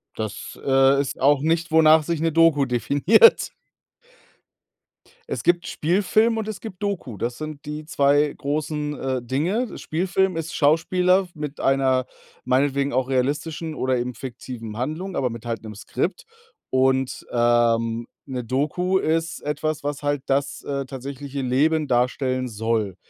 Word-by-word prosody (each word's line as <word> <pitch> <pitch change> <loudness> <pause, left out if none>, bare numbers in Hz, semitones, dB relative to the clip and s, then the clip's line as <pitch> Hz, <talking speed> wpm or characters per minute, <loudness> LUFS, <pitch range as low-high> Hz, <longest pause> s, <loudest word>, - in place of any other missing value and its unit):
Das, 110 -2 -6
äh, 135 0 +4
ist 135 - -5
auch 140 +1 +4
nicht, 165 +2 0
wonach 160 0 +6
sich 165 +1 -2
'ne 165 0 +1
Doku 160 -3 +4
definiert. 140 - +4 1.8
Es - - -3
gibt 175 0 +2
Spielfilm 210 +7 +2
und 220 -1 -3
es 215 - -5
gibt 205 -4 -9
Doku. 195 - -3
Das 120 +4 -3
sind 155 -2 -7
die 150 +1 -5
2 145 -1 +2
großen, 150 +1 -3
äh, 130 -1 -2
Dinge. 170 - -1
Spielfilm 185 +2 0
ist 165 0 -4
Schauspieler 180 +5 +3
w - - -25
mit 150 -2 -6
einer 130 -1 +2 0.4
meinetwegen 140 +2 +1
auch 130 +1 0
realistischen 150 +5 -1
oder 130 -2 0
eben 125 0 -4
fiktiven 120 -3 -7
Handlung, 155 - -4
aber 130 - 0
mit 115 0 -8
halt 115 -1 -3
'nem 110 -1 -9
Skript. 135 - -3 0.5
Und, 130 0 +1
ähm, 120 -1 +2 0.2
'ne 130 -3 -4
Doku 150 +10 0
ist 165 -1 -1
etwas, 150 +1 -2
was 145 0 -3
halt 145 -2 -1
das, 140 +1 -1
äh, 140 -1 -3
tatsächliche 140 +1 -6
Leben 150 +5 +2
darstellen 130 +1 0
soll. 110 -3 -1
140 Hz, 145 wpm, -23 LUFS, 130-160 Hz, 1.8 s, wonach